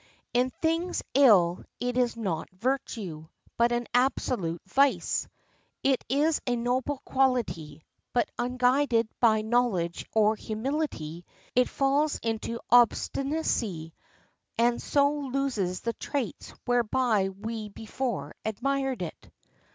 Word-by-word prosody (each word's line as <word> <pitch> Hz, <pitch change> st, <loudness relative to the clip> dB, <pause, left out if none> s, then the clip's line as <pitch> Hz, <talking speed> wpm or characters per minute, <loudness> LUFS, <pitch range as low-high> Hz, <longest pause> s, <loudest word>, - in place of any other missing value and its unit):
In 250 Hz, +1 st, +3 dB
things 330 Hz, +3 st, 0 dB
ill 200 Hz, -11 st, +5 dB, 0.2 s
it 245 Hz, 0 st, -2 dB
is 245 Hz, -2 st, +1 dB
not 185 Hz, -8 st, -2 dB
virtue, 190 Hz, -, -3 dB, 0.3 s
but 235 Hz, +1 st, +3 dB
an 240 Hz, 0 st, 0 dB
absolute 245 Hz, -9 st, +1 dB
vice. 275 Hz, +8 st, +2 dB, 0.6 s
It 270 Hz, -2 st, +2 dB
is 295 Hz, +4 st, +2 dB
a 245 Hz, -, +2 dB
noble 255 Hz, +3 st, -1 dB
quality; 180 Hz, -, 0 dB, 0.3 s
but 240 Hz, -, +2 dB
unguided 250 Hz, -1 st, +2 dB
by 220 Hz, -3 st, +4 dB
knowledge 220 Hz, -7 st, 0 dB
or 215 Hz, 0 st, +4 dB
humility, 215 Hz, -, -3 dB, 0.3 s
it 250 Hz, 0 st, +4 dB
falls 280 Hz, +2 st, +1 dB
into 230 Hz, 0 st, -2 dB
obstinacy, 240 Hz, -, +2 dB, 0.6 s
and 235 Hz, +1 st, +2 dB
so 285 Hz, 0 st, +3 dB
loses 260 Hz, -10 st, -1 dB
the 230 Hz, -, -2 dB
traits 275 Hz, -3 st, -4 dB
whereby 240 Hz, -4 st, +2 dB
we 215 Hz, +2 st, -6 dB
before 235 Hz, +4 st, -4 dB
admired 265 Hz, +1 st, -1 dB
it. 165 Hz, -, -8 dB
240 Hz, 110 wpm, -28 LUFS, 210-265 Hz, 0.6 s, ill